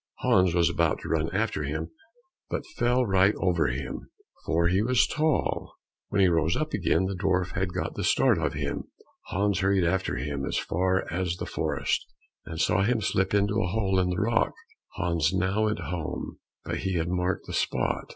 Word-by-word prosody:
Hans 90 -2 +3
was 85 -1 +4
about - - +1
to - - -7
run 80 0 +1
after 105 0 -1
him, 80 +3 -3 0.6
but - - -3
fell 125 +1 +3
right 95 0 +3
over 90 -3 +2
him, 65 +1 -4 0.4
for 85 +1 +2
he 95 +3 +2
was 115 -3 +3
so - - -5
tall. 155 -1 0 0.3
When 100 - +1
he 95 - +6
rose 85 -1 +2
up 155 0 -2
again, 90 +3 +2
the 95 - -2
dwarf 90 -1 0
had 95 0 -1
got 90 - -3
the - - -4
start - - +3
of - - -1
him. - - -3 0.4
Hans 100 0 0
hurried 95 -1 +2
after 95 -1 0
him 70 +2 -3
as - - -1
far 95 +2 0
as 90 -1 -1
the - - -5
forest, - - -1 0.4
and 80 0 -6
saw 95 - +2
him 115 +4 +2
slip 95 -1 0
into 100 +1 +2
a 100 - 0
hole 95 0 +1
in 90 -1 +2
the 90 - -1
rock. 115 +2 +1 0.4
Hans 85 -1 +1
now 95 +4 +1
went 105 0 0
home, 85 -1 -5 0.3
but - - -2
he 95 0 -2
had 85 -1 0
marked 90 +1 -1
the - - -7
spot. - - -1
95 Hz, 195 wpm, -27 LUFS, 85-100 Hz, 0.6 s, he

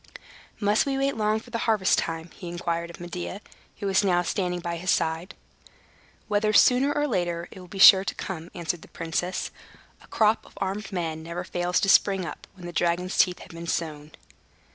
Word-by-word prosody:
"Must 210 +5 +2
we 270 -1 0
wait 275 +1 0
long 215 0 +1
for 235 +1 -10
harvest 220 -4 +2
time?" 165 0 -4
he 180 - -9
inquired 170 -1 -3
of 170 - -11
Medea, 175 +2 -6 0.4
who 205 - -6
was 195 +1 +3
now 175 -2 +2
standing 180 -1 -1
by 170 0 -4
his 185 +2 -4
side. 160 +3 0 0.9
"Whether 215 0 +1
sooner 255 +6 +5
or 290 0 0
later, 175 -8 -1
it - - -11
will 180 - -11
be 195 - -9
sure 190 0 +9
to - - -3
come," 170 -3 -6
answered 170 -1 -3
the - - -13
princess. 165 +2 -3 0.5
"A - - -18
crop 220 0 +2
of - - -18
armed 195 +1 -3
men 165 -4 -3
never 170 +2 -5
fails 180 0 0
to 195 - +1
spring 195 -2 +4
up, - - -8
when 180 -2 -11
the 175 - -7
dragon's 175 +2 0
teeth 180 -1 +3
have - - -12
been 170 0 -8
sown." 155 -3 -3
180 Hz, 195 wpm, -26 LUFS, 170-205 Hz, 0.9 s, sure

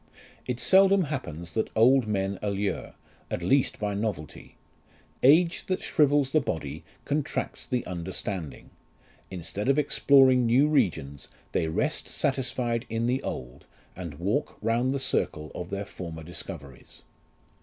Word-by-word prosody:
It 125 -1 -2
seldom 195 +3 +5
happens, 85 - -5
that 110 - -1
old 125 +2 +5
men 95 -2 -1
allure, 100 -1 -2 0.3
at 85 - -3
least 135 +9 +2
by 105 -1 -2
novelty: 100 -8 -4 0.7
age 165 +6 +4
that 185 - 0
shrivels 145 -3 +3
the 155 - +3
body 80 - -4 0.2
contracts 145 0 -2
the 125 -2 -1
understanding; 90 -1 -5 0.6
instead 95 +6 -4
of 135 - +4
exploring 135 -4 +5
new 130 +6 +4
regions, 80 - 0 0.2
they 80 - 0
rest 80 - -1
satisfied 125 -3 -1
in 115 +1 -1
the 125 +2 +1
old, 65 +2 -6 0.3
and 85 -5 -7
walk 105 - -1
round 120 +3 +1
the 135 - 0
circle 75 - -1
of 90 0 -6
their 100 +1 -3
former 80 -4 -8
discoveries. 75 -6 -9
110 Hz, 135 wpm, -27 LUFS, 85-135 Hz, 0.7 s, seldom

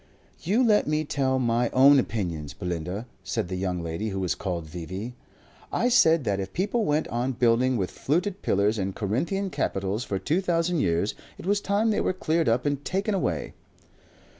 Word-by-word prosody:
"You 215 +9 +2
let 210 -2 +3
me 155 +1 0
tell 130 -2 0
my 120 -1 +1
own 135 +2 +7
opinions, 85 - -3
Belinda," 90 - -4 0.2
said 95 -2 -2
the 95 - -3
young 90 -2 -2
lady 85 +7 -3
who 95 -1 -3
was 90 -2 0
called 90 -4 -4
V.V. 90 +8 -6 0.6
"I 245 - +1
said 165 - +5
that 100 -4 0
if 95 0 -5
people 210 +4 0
went 150 -1 +1
on 125 +3 -1
building 120 +1 +2
with 95 -4 -2
fluted 185 +7 -1
pillars 105 +2 +1
and 95 0 -2
Corinthian 170 - -1
capitals 100 - -1
for 100 - -2
two 155 - 0
thousand 175 -2 +1
years, 85 -1 +1 0.2
it - - -10
was 200 +1 +1
time 205 +3 +1
they 210 - +1
were - - +1
cleared 165 -5 +1
up 120 +2 +1
and 145 -1 -1
taken 195 +3 -1
away." 90 - -1
120 Hz, 185 wpm, -26 LUFS, -, 0.6 s, own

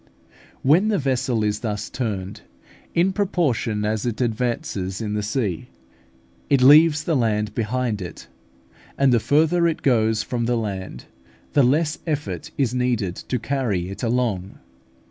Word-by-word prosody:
When 165 +10 +4
the 215 -2 +2
vessel 130 -5 0
is 105 0 0
thus 105 -2 -3
turned, 100 -7 -4 0.5
in 180 +3 +3
proportion 145 - 0
as 110 0 -1
it 120 -3 -3
advances 115 - -2
in 105 -2 -3
the 105 - -1
sea, 105 - -2 0.8
it 140 -3 +4
leaves 150 +2 +7
the 165 - 0
land 105 -4 0
behind 115 -2 -1
it, 90 -3 -8 0.7
and 135 -2 +4
the 120 - +4
further 160 +7 +3
it 165 - -2
goes 110 -4 +2
from 120 -2 -2
the 120 0 +1
land, 95 - -5 0.5
the 145 - +5
less 150 +5 +2
effort 150 -1 -3
is 130 -5 +1
needed 120 -8 0
to 125 - -3
carry 115 -9 -2
it 100 - -8
along. 115 -6 -1
120 Hz, 145 wpm, -22 LUFS, 105-140 Hz, 0.8 s, leaves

